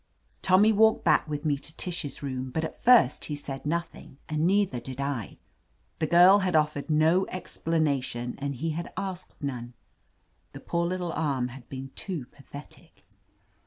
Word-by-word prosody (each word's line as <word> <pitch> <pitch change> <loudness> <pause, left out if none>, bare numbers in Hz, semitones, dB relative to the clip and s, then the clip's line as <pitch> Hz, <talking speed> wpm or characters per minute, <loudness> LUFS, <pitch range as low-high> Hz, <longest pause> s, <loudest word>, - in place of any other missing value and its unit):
Tommy 195 +4 +5
walked 220 +1 +4
back - - +4
with 150 +1 -4
me 145 -2 +2
to 155 - -9
Tish's 170 -6 -3
room, 130 -1 -3
but 160 +5 -2
at 160 - -6
first 245 -1 +5
he 150 - -3
said 140 -1 -6
nothing, 170 -4 -4
and 155 +2 0
neither 195 -9 +2
did 130 +2 -8
I. 140 -7 -3 0.6
The 160 - 0
girl 180 +5 +7
had 185 -3 0
offered 150 -1 +1
no 160 +5 +3
explanation, 145 -9 -2
and 140 0 -3
he 160 +6 -2
had 170 +2 -5
asked 185 -2 -5
none. 120 -3 -5 0.8
The - - -8
poor 170 0 -1
little 180 -1 -3
arm 135 -6 -1
had 125 0 -12
been 135 0 -7
too 175 -10 -4
pathetic. 140 +1 -14
155 Hz, 165 wpm, -27 LUFS, 135-175 Hz, 0.8 s, girl